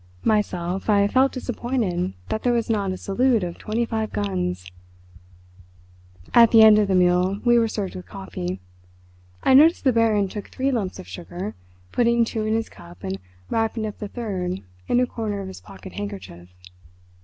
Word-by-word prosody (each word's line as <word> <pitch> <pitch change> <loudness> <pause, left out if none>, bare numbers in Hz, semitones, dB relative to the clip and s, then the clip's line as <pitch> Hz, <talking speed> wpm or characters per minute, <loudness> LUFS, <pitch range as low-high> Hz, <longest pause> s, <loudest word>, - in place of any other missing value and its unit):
Myself, 190 -3 0
I 200 -1 +4
felt 260 +5 +3
disappointed 235 - -2 0.2
that 220 - -2
there 245 - +2
was 235 -1 0
not 200 -3 0
a 185 - -4
salute 230 +3 +1
of 175 -1 -5
twenty 225 +2 -1
five 220 -1 -3
guns. 90 -3 -2 1.7
At 235 -1 +8
the 225 -1 +7
end 215 -1 +8
of 210 - +2
the 190 - +1
meal 180 +2 +3
we 240 0 +5
were 230 - +2
served 205 -3 -4
with 180 - -9
coffee. 95 - -6 0.8
I - - +4
noticed 310 +5 +6
the 260 -3 +3
Baron 220 -3 +3
took 205 +2 -7
three 270 +1 -1
lumps 210 -7 -2
of 185 - -10
sugar, 180 +3 -6 0.4
putting 235 -1 +3
two 220 -1 -3
in 220 - +1
his 225 0 -1
cup 85 +1 -15
and 95 +1 -4 0.3
wrapping 225 0 0
up 210 - -6
the 210 - -4
third 190 -5 -4 0.2
in 245 - +3
a 250 - +3
corner 220 -4 -4
of 195 - -5
his 190 - -10
pocket 195 -1 -12
handkerchief. 195 - -7
210 Hz, 180 wpm, -23 LUFS, 185-230 Hz, 1.7 s, At